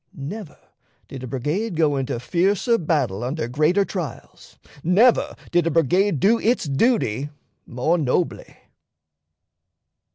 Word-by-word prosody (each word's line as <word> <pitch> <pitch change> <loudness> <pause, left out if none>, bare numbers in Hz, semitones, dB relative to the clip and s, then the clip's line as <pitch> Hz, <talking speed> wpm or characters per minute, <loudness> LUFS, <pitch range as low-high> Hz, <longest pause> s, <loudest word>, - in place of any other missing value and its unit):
Never 160 +5 -7 0.5
did 135 - -9
a 130 - -6
brigade 150 - -2
go 155 -3 +2
into 135 -2 -2
fiercer 195 - +1
battle 140 - -1
under 130 +1 -3
greater 155 +10 +2
trials; 175 -8 -7 0.3
never 210 +9 +3 0.2
did 175 -1 +2
a - - +3
brigade 165 +2 +2
do 225 - +3
its 230 -3 +1
duty 145 - +1 0.4
more 155 +9 0
nobly." 155 +4 -2
160 Hz, 120 wpm, -22 LUFS, 135-195 Hz, 0.5 s, never